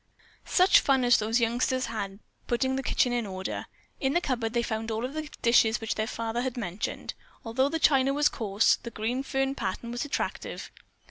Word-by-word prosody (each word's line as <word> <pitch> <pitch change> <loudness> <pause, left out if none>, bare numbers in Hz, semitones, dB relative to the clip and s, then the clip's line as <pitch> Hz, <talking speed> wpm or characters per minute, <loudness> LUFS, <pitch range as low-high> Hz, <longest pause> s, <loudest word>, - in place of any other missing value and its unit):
Such 370 +1 +6
fun 265 -2 +2
as 245 0 +5
those 225 +3 +1
youngsters 245 +2 +1
had 200 -3 -4 0.3
putting 260 +2 +1
the 270 - -1
kitchen 250 -2 +1
in 240 -3 -1
order. 190 0 -5 0.3
In 270 0 0
the 345 - +4
cupboard 240 -8 -2
they 235 -1 +1
found 220 -1 -3
all 225 +2 -2
of 260 - -6
the 310 -1 -5
dishes 235 -1 +4
which 225 -2 -2
their 215 0 -2
father 230 0 -3
had 255 -1 -3
mentioned. 195 -3 -4 0.3
Although 260 +5 +1
the 325 - -1
china 275 -4 +4
was 295 +1 +3
coarse, 210 -1 +2
the 235 - -8
green 235 +4 -2
fern 270 0 -1
pattern 235 -1 -4
was 240 0 -2
attractive. 290 - -4
240 Hz, 195 wpm, -28 LUFS, 225-265 Hz, 0.3 s, Such